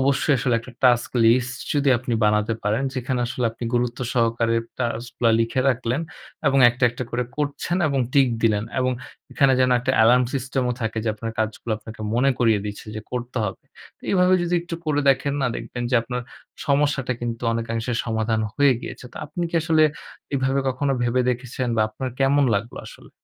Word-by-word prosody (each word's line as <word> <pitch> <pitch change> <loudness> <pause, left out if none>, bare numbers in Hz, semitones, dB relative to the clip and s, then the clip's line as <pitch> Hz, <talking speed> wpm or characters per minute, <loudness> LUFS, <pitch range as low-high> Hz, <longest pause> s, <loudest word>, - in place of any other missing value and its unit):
অবশ্যই 140 +2 +2
আসলে 120 +1 +1
একটা 120 +2 -11
টাস্ক 120 -1 +4
লিস্ট 125 +2 +3 0.2
যদি 145 -1 +2
আপনি 120 0 -4
বানাতে 105 +1 +2
পারেন। 105 +5 0
যেখানে 130 -1 -2
আসলে 125 +1 -3
আপনি 115 +2 -8
গুরুত্ব 120 0 0
সহকারে 115 -1 +1 0.2
টাস্ক 120 -1 -2
গুলা 115 -1 +4
লিখে 115 +3 0
রাখলেন 125 +2 0 0.5
এবং 135 0 +4
একটা, 125 +2 -1
একটা, 125 +2 -5
করে 125 +1 -1
করছেন 145 +4 -2
এবং 140 -2 0
টিক 135 -2 +5
দিলেন 105 -2 +2 0.2
এবং 130 0 +1 0.4
এখানে 135 -3 +4
যেন 130 0 +3
একটা 130 +1 0
এলার্ম 125 +3 +5
সিস্টেম 130 0 -1
ও - - +1
থাকে। 110 0 -2
যে - - 0
আপনার 115 +1 -5
কাজগুলো 110 +1 -2
আপনাকে 110 0 -11
মনে 135 +3 +3
করিয়ে 115 -4 +3
দিচ্ছে 105 +1 -7
যে - - -4
করতে 125 +1 -4
হবে। 95 -2 -5 0.5
এভাবে 180 -1 +4
যদি 175 0 0
একটু 170 -1 -6
করে 145 -1 +1
দেখেন 140 +1 0
না - - +2
দেখবেন 120 - -6
যে - - +1
আপনার 125 +1 -4 0.4
সমস্যাটা 140 -3 +1
কিন্তু 120 0 -4
অনেকাংশে 115 +1 -2
সমাধান 110 -1 0
হয়ে 145 -2 +5
গিয়েছে। - - -8
তো - - -14
আপনি 175 +4 -5
কি - - -9
আসলে 160 -1 +3 0.5
এভাবে 135 0 +1
কখনো 135 +2 0
ভেবে 120 +1 +1
দেখেছেন 125 0 -3
বা 110 - +3
আপনার 130 +5 -5
কেমন 140 +1 +3
লাগলো 115 +4 -5
আসলে? - - -15
125 Hz, 185 wpm, -23 LUFS, 115-135 Hz, 0.5 s, টিক